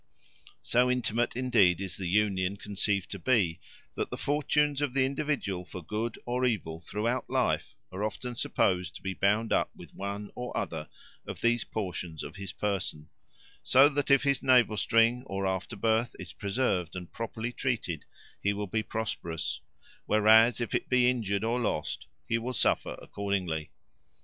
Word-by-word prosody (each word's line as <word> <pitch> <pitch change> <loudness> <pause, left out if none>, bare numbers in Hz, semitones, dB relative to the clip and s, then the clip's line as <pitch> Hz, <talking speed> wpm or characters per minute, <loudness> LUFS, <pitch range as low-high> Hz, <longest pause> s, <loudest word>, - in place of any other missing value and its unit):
So 125 +1 +3
intimate, 120 -2 0
indeed, 115 -9 +4
is 95 -2 -4
the 95 - -4
union 100 0 +1
conceived 100 -1 -1
to 100 - -4
be, 90 -5 +2 0.3
that - - -2
the - - -5
fortunes 150 0 +1
of 140 -3 -1
the 130 -1 +4
individual 135 -9 -1
for 90 0 -8
good 110 +6 -3
or 125 +1 -1
evil 95 -10 0
throughout 110 +8 -2
life - - 0 0.2
are 95 +3 -4
often 120 +3 -3
supposed 90 -5 +1
to - - -10
be 95 -1 -2
bound 105 +4 +2
up - - +2
with - - -13
one 100 +1 -5
or 125 0 -5
other 80 -2 -3 0.4
of - - -6
these 120 0 +3
portions 90 -6 -4
of 75 +6 -8
his 100 -1 -5
person, 95 -7 -2 0.5
so 135 +2 +7
that 145 -1 -1
if 140 -1 +5
his 140 -3 +2
navel 125 -5 +5
string 115 +4 +3
or 95 0 -2
afterbirth 110 +5 0
is 85 -5 -8
preserved 100 - -1
and 90 -2 -7
properly 115 +1 -4
treated, 110 - -2 0.4
he 100 - +2
will 105 0 -3
be 110 +3 -1
prosperous; 105 -7 -3 0.5
whereas 110 +2 +6
if 120 - -3
it - - -1
be 125 -1 +5
injured 105 -5 -1
or 115 +2 +1
lost, 105 -10 -2 0.2
he 115 - +1
will 125 +3 -4
suffer - - +1
accordingly. 90 -7 -2
105 Hz, 165 wpm, -29 LUFS, 95-125 Hz, 0.5 s, so